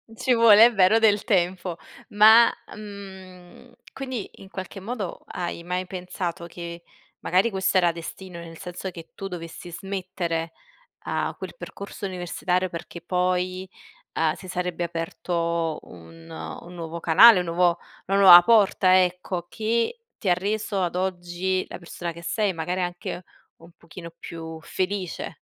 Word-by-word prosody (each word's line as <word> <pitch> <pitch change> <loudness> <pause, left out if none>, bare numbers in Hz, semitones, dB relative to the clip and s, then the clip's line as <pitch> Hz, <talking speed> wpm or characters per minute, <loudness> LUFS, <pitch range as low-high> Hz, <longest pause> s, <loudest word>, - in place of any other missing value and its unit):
Ci 255 +3 +1
vuole, 230 -2 +8
è 240 - -3
vero, 195 +3 +5
del 210 -2 +3
tempo. 180 -4 0 0.4
Ma, 220 +3 +8 0.2
mhmm, 190 -4 -11 0.2
quindi 260 -6 -5
in 195 - -14
qualche 190 0 -7
modo 205 -1 -5
hai 175 -1 -5
mai 180 +1 -2
pensato 180 -1 -5
che 170 0 -8 0.4
magari 185 +6 +2
questo 190 -1 0
era 175 -2 +4
destino, 170 +2 -8
nel 165 -1 -10
senso 180 +3 -6
che 165 -2 -11
tu 195 - -5
dovessi 175 -1 -8
smettere 175 -3 -4 0.5
a - - -1
quel - - -7
percorso 200 - -8
universitario 180 0 -1
perché 170 0 -8
poi, 180 +1 -1 0.5
uhm, 160 -1 +2
si 185 +1 -12
sarebbe 180 -1 -3
aperto 170 -1 -2
un 80 -1 -14 0.3
un 175 +1 -12
nuovo 165 0 -6
canale 185 +7 +8
un 180 - -1
nuovo 170 +1 +2 0.3
una 195 +1 +2
nuova 180 -3 +10
porta 190 -3 +5
ecco, 180 -1 -3
che 230 - -1 0.2
ti 200 - -3
ha 180 - +5
reso 200 +1 -2
ad 175 -1 -2
oggi 185 0 -1
la - - -8
persona 170 0 -6
che 170 - -12
sei, 205 +2 0
magari 180 +2 -2
anche 175 0 -4 0.4
un 165 +1 -16
pochino 170 0 -11
più 160 -1 -8
felice. 185 -1 -3
180 Hz, 145 wpm, -25 LUFS, 170-195 Hz, 0.5 s, nuova